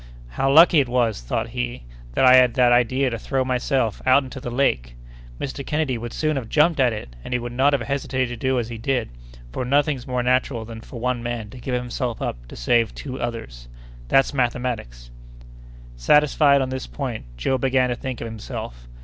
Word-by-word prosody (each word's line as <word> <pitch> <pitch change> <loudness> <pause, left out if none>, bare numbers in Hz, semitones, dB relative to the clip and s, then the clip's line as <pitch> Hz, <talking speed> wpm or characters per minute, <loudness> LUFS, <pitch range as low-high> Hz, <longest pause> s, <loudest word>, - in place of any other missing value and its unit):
"How 135 - 0
lucky 160 +2 +7
it 135 -3 +1
was," 120 - +1
thought - - -3
he, - - -4 0.3
"that - - +3
I 130 - +8
had 125 -2 +6
that 125 -2 +4
idea 125 +2 +2
to 115 - -4
throw 135 +3 -1
myself 125 -3 0
out 130 +2 +5
into 130 0 -8
the 125 - -5
lake! 65 - 0 0.4
Mr. 140 0 -4
Kennedy 150 -3 -1
would 120 0 -6
soon 155 +1 -1
have 120 -4 -5
jumped 155 +1 +3
at 125 -2 +4
it, 90 - -7
and 125 - -3
he - - +1
would 120 0 -6
not 135 +4 +3
have 135 -4 +1
hesitated 130 0 -1
to 120 - -5
do 130 0 +2
as 120 -1 -2
I 115 - -5
did, 125 0 -1 0.4
for 125 - -3
nothing's 140 0 +1
more 125 -1 -1
natural 125 -2 0
than 115 0 -9
for 120 - -10
one 125 0 -1
man 115 -3 -4
to 125 - -11
give 125 0 -2
himself 125 -1 -3
up - - -5
to - - -11
save 115 - +1
two 130 -2 -6
others. 115 - -6 0.4
That's 135 - +3
mathematics!" 120 - -2 0.8
Satisfied 140 - +4
on 130 - -3
this 130 0 -5
point, 125 - -5
Joe 130 - 0
began 130 -1 +2
to 120 - -1
think 130 0 -6
of - - -4
himself. 80 - -7
125 Hz, 205 wpm, -22 LUFS, 115-135 Hz, 0.8 s, I